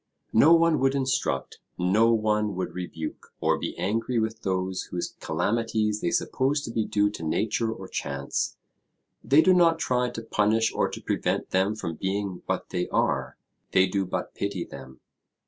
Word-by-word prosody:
No 155 +9 +7
one 165 -2 +3
would 135 +1 +2
instruct, 130 - -1 0.2
no 105 +6 +3
one 105 -2 +1
would 95 - -3
rebuke, 85 -3 -6
or - - +1
be - - -4
angry 115 +5 -1
with 110 0 -1
those 95 -2 -2
whose 90 -1 -4
calamities 105 +5 0
they 175 - +1
suppose 145 -3 0
to 115 - -5
be 115 -2 0
due 105 0 +2
to 105 - -8
nature 110 +7 0
or 95 -4 -7
chance; 70 -5 -3 0.7
they 145 +4 +5
do 185 - +6
not 170 -2 +5
try 125 -5 0
to 115 -1 -7
punish 110 +1 +2
or - - +1
to - - -7
prevent - - -1
them 95 +3 +2
from 85 -7 -5
being 95 -1 -2
what - - -2
they 90 0 -1
are; 65 -1 0 0.4
they 95 - +6
do 95 +1 0
but 90 - -4
pity 100 -3 -3
them. 65 -1 -11
105 Hz, 170 wpm, -26 LUFS, 95-115 Hz, 0.7 s, No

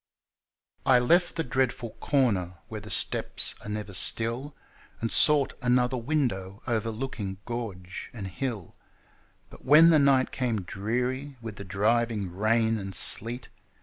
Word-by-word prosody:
I 130 -2 +5
left 170 +9 +2
the 165 - -1
dreadful 125 -3 -1
corner 100 -11 0
where - - -6
the - - -11
steps - - 0
are - - -8
never 105 -1 -5
still, 115 +8 +2 0.4
And 115 - -3
sought 150 -3 +4
another 125 0 +2
window 115 -8 -2
overlooking 110 -3 -3
gorge 100 -7 -6
and 105 -5 -7
hill; 105 -1 -5 0.8
But - - -15
when 155 +5 +7
the 155 - +5
night 135 -2 +3
came 120 -6 -2
dreary 125 +9 -3
with 115 -3 -8
the 100 - -7
driving 105 +1 0
rain 110 +2 +1
and 95 -2 -5
sleet. 120 +7 +3
115 Hz, 135 wpm, -27 LUFS, 100-130 Hz, 0.8 s, when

